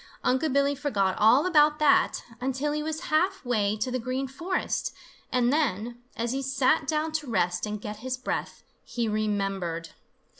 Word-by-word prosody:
Unc' 260 Hz, +4 st, +1 dB
Billy 280 Hz, +1 st, +3 dB
forgot 205 Hz, -10 st, 0 dB
all 235 Hz, +9 st, +6 dB
about 300 Hz, -4 st, +4 dB
that, 300 Hz, -2 st, +3 dB, 0.2 s
until 265 Hz, +3 st, -1 dB
he 300 Hz, 0 st, -1 dB
was 315 Hz, +1 st, -3 dB
half 365 Hz, +1 st, +2 dB
way 215 Hz, -4 st, +1 dB
to 235 Hz, +4 st, -2 dB
the 255 Hz, -, -1 dB
Green 255 Hz, +3 st, -2 dB
Forest, 335 Hz, +8 st, -2 dB, 0.4 s
and 250 Hz, 0 st, +2 dB
then, 240 Hz, -5 st, -1 dB, 0.2 s
as 235 Hz, +1 st, -1 dB
he 270 Hz, +1 st, -1 dB
sat 270 Hz, +2 st, +2 dB
down 310 Hz, 0 st, 0 dB
to 310 Hz, -2 st, -3 dB
rest 180 Hz, -2 st, 0 dB
and 210 Hz, 0 st, -4 dB
get 210 Hz, +1 st, -6 dB
his 255 Hz, +3 st, -4 dB
breath, 255 Hz, -, -4 dB, 0.2 s
he 235 Hz, -2 st, -2 dB
remembered. 195 Hz, -6 st, -1 dB
255 Hz, 165 wpm, -27 LUFS, 215-295 Hz, 0.4 s, all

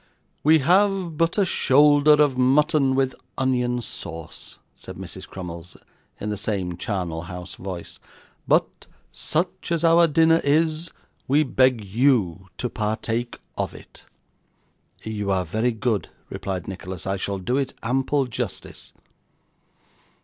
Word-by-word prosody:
'We 155 Hz, +2 st, +6 dB
have 190 Hz, -1 st, +3 dB
but 165 Hz, +4 st, +1 dB
a 200 Hz, -, +4 dB
shoulder 145 Hz, -1 st, +5 dB
of 150 Hz, -3 st, +4 dB
mutton 135 Hz, +1 st, +3 dB
with 135 Hz, -1 st, +1 dB, 0.2 s
onion 125 Hz, -2 st, 0 dB
sauce,' 80 Hz, -7 st, -8 dB, 0.2 s
said -, -, -11 dB
Mrs. -, -, -9 dB
Crummles, 90 Hz, -1 st, -8 dB, 0.4 s
in 105 Hz, -, -3 dB
the 105 Hz, -, -3 dB
same 95 Hz, -4 st, -2 dB
charnel 90 Hz, -4 st, -3 dB
house 90 Hz, 0 st, -7 dB
voice; 90 Hz, -3 st, -8 dB, 0.5 s
'but -, -, +1 dB, 0.2 s
such 170 Hz, +2 st, -2 dB
as 170 Hz, -1 st, 0 dB
our 170 Hz, 0 st, +6 dB
dinner 165 Hz, +1 st, +4 dB
is, 155 Hz, +3 st, +1 dB, 0.4 s
we 145 Hz, +4 st, +4 dB
beg 130 Hz, -5 st, +2 dB
you 100 Hz, -5 st, +1 dB
to 125 Hz, -, -2 dB
partake 115 Hz, +2 st, -2 dB, 0.2 s
of -, -, -3 dB
it.' -, -, -14 dB, 1.0 s
'You 105 Hz, -2 st, -3 dB
are 95 Hz, -2 st, +1 dB
very 110 Hz, +9 st, 0 dB
good,' 110 Hz, -2 st, -1 dB, 0.2 s
replied 95 Hz, -3 st, -4 dB
Nicholas, 95 Hz, -2 st, -7 dB
'I 95 Hz, +1 st, -1 dB
shall 100 Hz, +1 st, -3 dB
do 120 Hz, +8 st, -1 dB
it 140 Hz, -2 st, -2 dB
ample 135 Hz, +4 st, +1 dB
justice. 125 Hz, -, -6 dB
125 Hz, 130 wpm, -24 LUFS, 100-150 Hz, 1.0 s, We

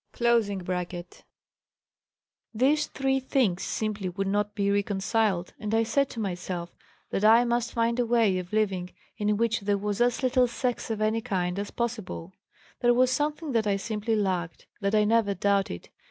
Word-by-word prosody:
] -, -, -22 dB
These 230 Hz, -5 st, +2 dB, 2.2 s
three 270 Hz, 0 st, 0 dB
things 250 Hz, -8 st, +1 dB
simply 210 Hz, -3 st, -2 dB
would 195 Hz, +3 st, -3 dB
not 205 Hz, +1 st, -1 dB
be 200 Hz, -1 st, +1 dB
reconciled 200 Hz, -1 st, 0 dB
and 210 Hz, +1 st, -2 dB
I 225 Hz, -, +3 dB
said 275 Hz, +5 st, +1 dB
to 235 Hz, -, -7 dB
myself 180 Hz, -3 st, -4 dB, 0.4 s
that 195 Hz, -, -1 dB
I 225 Hz, +3 st, +7 dB
must 240 Hz, 0 st, 0 dB
find 235 Hz, +1 st, +1 dB
a 245 Hz, -, +2 dB
way 225 Hz, -6 st, +3 dB
of 180 Hz, -1 st, -8 dB
living 195 Hz, -4 st, 0 dB, 0.3 s
in 210 Hz, 0 st, +1 dB
which 230 Hz, +1 st, +1 dB
there 200 Hz, -1 st, 0 dB
was 205 Hz, +2 st, -2 dB
as 245 Hz, +1 st, +2 dB
little 255 Hz, -1 st, +3 dB
sex 245 Hz, 0 st, -2 dB
of 220 Hz, -1 st, -2 dB
any 220 Hz, +1 st, +1 dB
kind 185 Hz, -4 st, -2 dB
as 205 Hz, -, -4 dB
possible. 215 Hz, -6 st, -4 dB, 0.5 s
There 240 Hz, 0 st, +4 dB
was 255 Hz, +1 st, +4 dB
something 300 Hz, +2 st, -1 dB
that 225 Hz, -3 st, +1 dB
I 200 Hz, -, +2 dB
simply 215 Hz, +2 st, -2 dB
lacked; 185 Hz, -5 st, -2 dB
that 200 Hz, +1 st, 0 dB
I 210 Hz, -, +5 dB
never 210 Hz, -2 st, +2 dB
doubted. 195 Hz, -, 0 dB
215 Hz, 170 wpm, -27 LUFS, 195-235 Hz, 2.2 s, I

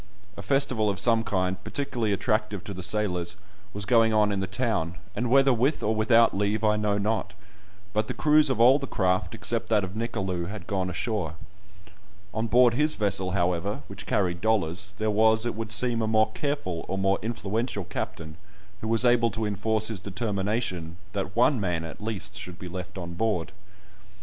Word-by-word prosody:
A -, -, -7 dB
festival 110 Hz, -1 st, +1 dB
of 100 Hz, -, -2 dB
some 115 Hz, -2 st, +3 dB
kind, 95 Hz, -3 st, -1 dB
particularly 120 Hz, -6 st, -2 dB
attractive 105 Hz, 0 st, -1 dB
to 100 Hz, -, -6 dB
the 95 Hz, -, -7 dB
sailors, 90 Hz, -3 st, -1 dB, 0.4 s
was 100 Hz, 0 st, -4 dB
going 115 Hz, +1 st, +4 dB
on 105 Hz, -1 st, +3 dB
in 100 Hz, -, -1 dB
the 95 Hz, -, -2 dB
town, 100 Hz, -5 st, -1 dB, 0.2 s
and 120 Hz, 0 st, -1 dB
whether 135 Hz, +1 st, +5 dB
with 130 Hz, +6 st, +1 dB
or 110 Hz, -, +2 dB
without 115 Hz, +1 st, +4 dB
leave 105 Hz, +2 st, 0 dB
I 105 Hz, -1 st, +3 dB
know 105 Hz, -1 st, 0 dB
not, 100 Hz, -1 st, -1 dB, 0.6 s
but 110 Hz, 0 st, 0 dB
the -, -, -4 dB
crews 150 Hz, -1 st, +4 dB
of 130 Hz, -4 st, 0 dB
all 130 Hz, +4 st, +6 dB
the 140 Hz, -, -5 dB
craft, 95 Hz, -2 st, 0 dB
except 115 Hz, -1 st, 0 dB
that 105 Hz, -3 st, +3 dB
of 95 Hz, -1 st, -5 dB
Nicolou, 95 Hz, -6 st, -2 dB
had 100 Hz, -4 st, -7 dB
gone 95 Hz, -1 st, -1 dB
ashore. 90 Hz, -4 st, -2 dB, 1.0 s
On 110 Hz, +1 st, -1 dB
board 120 Hz, +1 st, +5 dB
his 150 Hz, +5 st, +2 dB
vessel, 95 Hz, -3 st, 0 dB
however, 90 Hz, +1 st, 0 dB
which -, -, -8 dB
carried 90 Hz, -3 st, 0 dB
dollars, 100 Hz, -2 st, 0 dB
there 110 Hz, 0 st, 0 dB
was, 110 Hz, +2 st, +3 dB
it 120 Hz, -, -1 dB
would 110 Hz, 0 st, -5 dB
seem, 115 Hz, +2 st, +2 dB
a 110 Hz, -, 0 dB
more 110 Hz, 0 st, +3 dB
careful, 110 Hz, -, -3 dB
or 95 Hz, -, -2 dB
more 95 Hz, 0 st, +1 dB
influential 110 Hz, -1 st, -2 dB
captain, 80 Hz, -2 st, -6 dB, 0.4 s
who 110 Hz, -, -4 dB
was 115 Hz, +2 st, +3 dB
able 120 Hz, -1 st, +4 dB
to 110 Hz, -1 st, -3 dB
enforce 110 Hz, +2 st, 0 dB
his 110 Hz, -4 st, -4 dB
determination 100 Hz, -3 st, -2 dB, 0.2 s
that 100 Hz, -1 st, -3 dB
one 125 Hz, +2 st, +4 dB
man, 90 Hz, -5 st, -1 dB
at 80 Hz, -, -8 dB
least, 105 Hz, -2 st, -3 dB
should 90 Hz, -1 st, -7 dB
be 90 Hz, -, -8 dB
left 90 Hz, +1 st, -7 dB
on 85 Hz, -1 st, -6 dB
board. 90 Hz, -2 st, -1 dB
105 Hz, 190 wpm, -26 LUFS, 95-115 Hz, 1.0 s, all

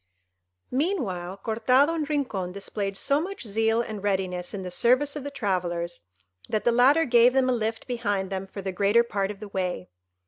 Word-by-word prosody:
Meanwhile 225 Hz, -, -1 dB
Cortado 255 Hz, +7 st, +3 dB
and 310 Hz, -3 st, -2 dB
Rincon 235 Hz, -12 st, -1 dB
displayed 200 Hz, 0 st, -4 dB
so 280 Hz, +7 st, +1 dB
much 385 Hz, -4 st, -6 dB
zeal 225 Hz, +2 st, +1 dB
and 215 Hz, -3 st, -6 dB
readiness 185 Hz, -3 st, -1 dB
in 195 Hz, -2 st, -5 dB
the 180 Hz, -, -6 dB
service 255 Hz, +9 st, +2 dB
of 295 Hz, -, -5 dB
the 285 Hz, -, -4 dB
travellers, 175 Hz, -8 st, -2 dB, 0.5 s
that 215 Hz, -, 0 dB
the 240 Hz, -, +3 dB
latter 270 Hz, +7 st, +5 dB
gave 245 Hz, 0 st, +5 dB
them 260 Hz, -1 st, +3 dB
a -, -, +3 dB
lift 225 Hz, -1 st, -2 dB
behind 205 Hz, -6 st, -2 dB
them 190 Hz, 0 st, -3 dB
for 195 Hz, 0 st, -8 dB
the 190 Hz, -, -2 dB
greater 200 Hz, +5 st, +3 dB
part 200 Hz, -4 st, -2 dB
of 205 Hz, -1 st, -7 dB
the 210 Hz, -, -7 dB
way. 180 Hz, -, -3 dB
215 Hz, 185 wpm, -26 LUFS, 190-255 Hz, 0.5 s, latter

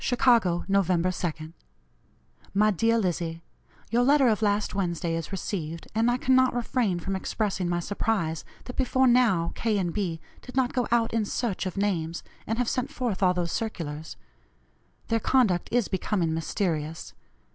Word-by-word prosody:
"CHICAGO, 235 Hz, -9 st, +3 dB
Nov. 195 Hz, -2 st, +2 dB
2nd. 170 Hz, -3 st, -1 dB, 1.0 s
"MY 210 Hz, +1 st, +4 dB
DEAR 230 Hz, +4 st, +2 dB
LIZZIE: 170 Hz, -5 st, -2 dB, 0.5 s
Your 235 Hz, +1 st, +3 dB
letter 275 Hz, 0 st, +5 dB
of 220 Hz, -1 st, +1 dB
last 205 Hz, -1 st, +1 dB
Wednesday 170 Hz, -3 st, -1 dB
is 165 Hz, +1 st, -4 dB
received, 170 Hz, -4 st, -4 dB
and 225 Hz, +2 st, +2 dB
I 245 Hz, -, +2 dB
cannot 260 Hz, 0 st, +3 dB
refrain 235 Hz, -6 st, 0 dB
from 195 Hz, +3 st, -3 dB
expressing 190 Hz, -2 st, -2 dB
my 175 Hz, 0 st, 0 dB
surprise 175 Hz, -3 st, -1 dB, 0.2 s
that 250 Hz, -, -8 dB
before 260 Hz, 0 st, +2 dB
now 235 Hz, -9 st, +3 dB
K. 220 Hz, -2 st, 0 dB
and 175 Hz, -4 st, -1 dB
B. 175 Hz, -6 st, -2 dB, 0.2 s
did 255 Hz, -, -11 dB
not 260 Hz, -2 st, +1 dB
go 250 Hz, -2 st, 0 dB
out 235 Hz, -1 st, +2 dB
in 225 Hz, -1 st, +2 dB
search 205 Hz, -2 st, -2 dB
of 185 Hz, -, -6 dB
names, 175 Hz, -5 st, -1 dB, 0.2 s
and 225 Hz, -, -1 dB
have 245 Hz, -1 st, 0 dB
sent 255 Hz, +3 st, -1 dB
forth 240 Hz, -7 st, -3 dB
all 180 Hz, -1 st, +4 dB
those 175 Hz, -1 st, -1 dB
circulars. 160 Hz, -8 st, -4 dB, 0.9 s
Their 225 Hz, -, +2 dB
conduct 220 Hz, -9 st, +2 dB
is 240 Hz, -3 st, +2 dB
becoming 185 Hz, -3 st, -1 dB
mysterious. 160 Hz, -2 st, -2 dB
200 Hz, 160 wpm, -27 LUFS, 170-235 Hz, 1.0 s, letter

